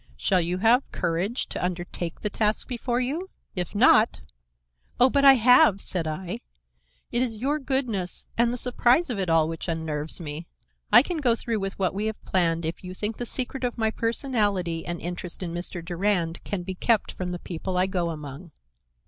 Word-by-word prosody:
"Shall 180 - +2
you 175 +2 -1
have 230 +7 +3
courage 185 +9 -1
to - - -4
undertake 175 -1 -4
the 210 - -1
task 210 0 +1
before 245 -1 -1
you? 305 +9 -2 0.3
If 180 +1 -3
not—" 220 0 +5 0.8
"Oh, 250 +1 +6
but 280 -1 +2
I 275 -1 +10
have," 240 -5 +6
said 180 -4 -2
I. 165 -2 -4 0.7
"It 240 - +1
is 235 -4 -1
your 280 +7 0
goodness 250 - -2
and 235 0 +3
the 245 - -2
surprise 250 +5 +2
of 215 - -3
it 185 -3 -1
all 165 -1 +4
which 165 +2 -5
unnerves 160 -2 -2
me. 160 0 -6 0.4
I 240 +4 +9
can 350 +2 -3
go 250 -6 +2
through 230 -1 -2 0.2
what 190 -2 0
we 205 +3 -2
have 220 - -4
planned 170 -3 +1
if 165 +3 -4
you 185 0 -7
think 210 +3 -3
the 245 - -4
secret 260 +1 -4
of 245 -1 -2
my 220 -1 +1
personality 205 - 0
and 175 -1 -3
interest 175 +1 -5
in 170 -2 -4
Mr. 175 0 -4
Durand 175 -1 0
can 195 -3 -3
be 190 +1 -4
kept 220 +4 +1
from 185 - -5
the 180 - -3
people 180 +2 -4
I 180 - +4
go 180 -3 -1
among." 150 +1 -8
195 Hz, 190 wpm, -25 LUFS, 175-240 Hz, 0.8 s, I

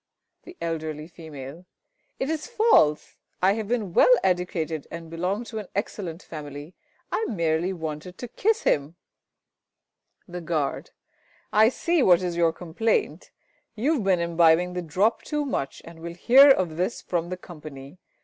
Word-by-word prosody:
The 355 0 -12
Eld. 165 -2 -3
F. 155 +2 -7
It 150 0 -9 0.7
is 310 -1 -3
false! 435 - +3 0.2
I 190 +2 +4
have 220 -1 -4
been 215 -6 -2
well 255 - +6
educated, 175 -4 -1
and 165 -1 -8
belong 180 +7 -2
to 225 -2 -6
an 210 - -8
excellent 185 -4 -4
family. 145 +1 -8 0.4
I - - 0
merely 170 - 0
wanted 160 0 -6
to 245 - -6
kiss 445 - 0
him. 145 +3 +1 1.3
The 180 -1 -6
Guard. 155 -4 -2 0.6
I 220 +1 +6
see 335 +5 0
what 185 -6 +5
is 175 -1 -2
your 170 -1 +3
complaint. 185 - -1 0.5
You 260 +9 +1
have 265 -9 -1
been 190 -2 +3
imbibing 170 +1 +3
the 180 - -3
drop 190 +8 +1
too 295 -1 -2
much 140 - -3
and 165 0 -12
will 170 +1 -7
hear 265 +10 +7
of 180 -11 +3
this 185 +6 -2
from 170 -1 -2
the 185 - -4
Company. 155 -3 -11
175 Hz, 155 wpm, -25 LUFS, 160-215 Hz, 1.3 s, hear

